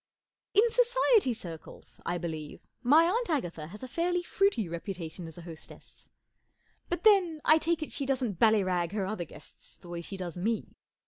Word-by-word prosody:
I - - +9
N 470 - +2
Society 485 - +4
circles, 170 -8 -9
I 175 - 0
believe, 160 -3 -6 0.2
my 295 +6 +6
Aunt 455 +6 0
Agatha 175 - -2
has 210 +8 -10
a - - -4
fairly 350 +6 0
fruity 390 - +1
reputation 170 0 -6
as 160 - -11
a 175 - -9
hostess. 165 -2 -11 0.8
But 350 0 -2
then, 380 -7 +5
I 310 +1 +6
take 330 0 0
it - - -7
she 275 - -3
doesn't 250 -9 -1
ballyrag 185 -5 +3
her 205 -3 -1
other 190 -3 -3
guests 150 - -14
the 175 - -15
way 170 -1 -4
she 195 +3 -6
does 180 -2 -5
me. 220 +4 -1
220 Hz, 180 wpm, -30 LUFS, -, 0.8 s, I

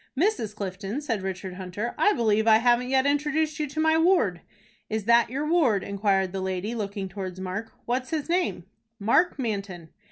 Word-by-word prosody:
"Mrs. 325 - 0
Clifton," 195 +4 -4
said 230 -9 -2
Richard 190 0 -5
Hunter, 190 +5 -5
"I 415 - +3
believe 220 - +1
I 220 -1 +7
haven't 240 +2 +2
yet 265 0 +3
introduced 300 +2 0
you 300 - -1
to 285 +3 -6
my 320 0 +3
ward." 325 - +3 0.5
"Is 220 -1 -2
that 235 +2 +4
your 275 +5 -2
ward?" 285 - +3
inquired 195 -2 0
the 190 0 -4
lady, 190 +4 -2
looking 200 -3 -4
towards 185 -1 -6
Mark. 190 +4 -5
"What 245 +2 0
is - - -14
his 310 -3 -2
name?" 345 - 0 0.3
"Mark 235 - +2
Manton." 200 - -4
220 Hz, 185 wpm, -26 LUFS, 195-285 Hz, 0.5 s, I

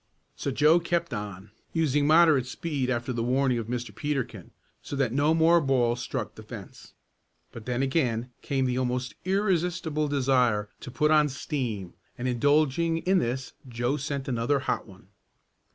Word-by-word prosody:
So - - -3
Joe 150 +5 +4
kept 170 -3 -1
on, 105 -2 -6 0.2
using 145 -3 +2
moderate 155 -5 +5
speed 140 -2 -3
after 125 +1 -1
the 115 - -2
warning 125 +1 +1
of 110 - -5
Mr. 120 -2 -4
Peterkin, 125 - -3 0.3
so - - -6
that 135 -4 0
no 145 +4 +3
more 165 +1 +5
balls 125 -4 +1
struck - - -4
the - - -11
fence. - - -11 0.6
But 115 -1 -10
then 125 +1 0
again 125 -4 0
came 135 -2 0
the 125 0 0
almost 125 0 -2
irresistible 180 -5 0
desire 125 -7 +2
to - - -8
put 150 +5 +1
on 150 -1 +5
"steam," 120 - -4 0.2
and 125 0 -3
indulging 150 +6 +2
in 185 +3 +2
this 130 +2 -3 0.2
Joe 120 +3 -1
sent 140 -1 -4
in 130 - -1
another 120 +4 +1
"hot 130 - -2
one." 95 -1 -16
135 Hz, 165 wpm, -27 LUFS, 120-150 Hz, 0.6 s, moderate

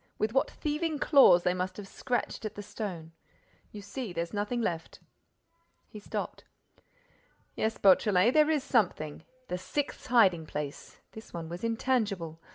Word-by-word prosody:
With 215 +1 -1
what 270 - +2
thieving 305 +1 -2
claws 275 - +6
they 180 - +2
must 185 0 -3
have 205 -2 -8
scratched 245 +3 -3
at 215 -1 -5
the 205 - -7
stone. 195 -6 -6 0.6
You 205 -1 -9
see, 215 -1 -6
there's 170 +1 -3
nothing 210 +4 -1
left." 170 -7 -3 0.9
He 210 - -10
stopped. 205 - -5 1.1
"Yes, 220 0 -1
Beautrelet, 195 +3 +4
there 305 0 +5
is 300 -4 +1
something—the 180 - -2
sixth 285 +9 -4
hiding 190 -10 +4
place! 145 -1 -6
This 220 -4 -11
one 165 -1 -5
was 175 +4 -7
intangible. 220 -8 -1
205 Hz, 145 wpm, -29 LUFS, 175-245 Hz, 1.1 s, claws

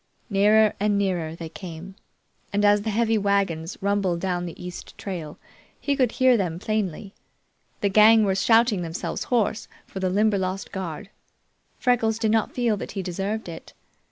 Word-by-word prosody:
Nearer 210 +2 +4
and 205 0 +1
nearer 175 -5 -1
they 165 -1 -7
came, 175 +1 -9 0.6
and 205 +1 +1
as 205 0 +5
the 220 - -3
heavy 225 +1 +1
wagons 195 -4 0
rumbled 195 -3 0
down 180 -1 -2
the 170 - -9
east 180 0 -9
trail 170 -7 -6 0.4
he 285 - 0
could 255 -4 +1
hear 255 -1 +4
them 175 -5 -2
plainly. 200 -1 -3 0.7
The 200 - +2
gang 215 +2 +6
were 195 - +2
shouting 225 0 +3
themselves 165 0 -4
hoarse 225 -3 0 0.2
for 190 - -8
the 190 -1 0
Limberlost 195 -1 0
guard. 190 +1 -6 0.7
Freckles 225 -3 +1
did 220 -2 0
not 225 -1 +1
feel 235 -4 +1
that - - -7
he 195 -2 -3
deserved 195 +5 -3
it. 165 -1 -9
200 Hz, 160 wpm, -24 LUFS, 180-220 Hz, 0.7 s, gang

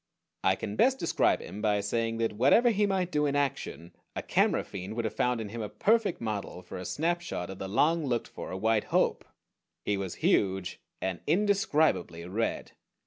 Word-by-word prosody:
I 95 - +4
can 100 +2 -5
best 265 +1 +4
describe - - +2
him 105 - -8
by 105 -2 +2
saying 115 +3 -1
that 115 -1 0
whatever 140 - +5
he 205 -1 +2
might 185 -2 0
do 150 -2 +2
in 140 - -1
action, 105 - -2 0.2
a - - -3
camera - - +2
fiend 100 +3 -7
would 120 -1 -2
have 110 - -2
found 125 +1 +1
in 110 -2 -5
him 115 +2 -5
a 105 - -4
perfect 215 - +2
model 105 -5 -4
for 90 - -8
a 90 - -6
snapshot 165 - -2
of 95 - -9
the 95 - -4
long 160 - +2
looked 120 -2 -1
for 95 - -7
White 110 +1 +1
Hope. - - +1 0.6
He 105 - +1
was 95 -3 -4
huge 95 -2 +1 0.2
and 95 -2 -2
indescribably 160 - +2
red. 105 +6 -2
115 Hz, 190 wpm, -29 LUFS, 95-160 Hz, 0.6 s, whatever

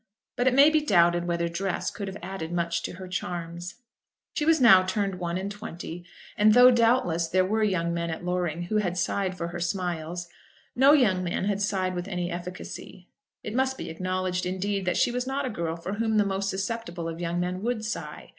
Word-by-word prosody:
But 245 - +1
it 255 - +4
may 285 +3 +7
be 310 -1 +3
doubted 175 - +3
whether 170 0 0
dress 180 +2 -2
could 200 -3 -6
have 190 +1 -6
added 175 -3 -5
much 170 -1 -1
to - - -5
her 185 +1 -9
charms. 175 -1 -5 0.6
She 295 - -1
was 325 -1 +5
now 225 -7 +8
turned 190 0 -2
one 175 0 -2
and 195 +2 -4
twenty, 175 -4 -7 0.3
and 215 +1 +5
though, 250 +1 +9
doubtless, 230 -9 +2
there 185 +2 +2
were 215 +3 0
young 170 -5 0
men 170 0 -2
at 165 +2 -5
Loring 175 -2 -1
who 215 +5 -1
had 180 -4 -1
sighed 185 +1 -1
for 170 -1 -3
her 175 0 -6
smiles, 175 -1 -3 0.5
no 270 +3 +6
young 210 -11 +3
man 175 +1 -2
had 200 0 0
sighed 190 -2 0
with 175 +1 -4
any 180 -2 -3
efficacy. 180 +1 -8 0.3
It 215 - -5
must 265 +1 +1
be - - -6
acknowledged, 185 +1 -2
indeed, 195 +1 -2
that 180 - 0
she - - +3
was 250 +1 -2
not 275 +1 -1
a 255 - -2
girl 170 -5 -3
for 170 +3 -5
whom 220 +1 0
the 210 - +4
most 195 0 -1
susceptible 190 -4 -3
of 165 +1 -5
young 170 0 -1
men 180 +1 -2
would 225 -1 -2
sigh. 230 - -6
185 Hz, 210 wpm, -27 LUFS, 175-210 Hz, 0.6 s, though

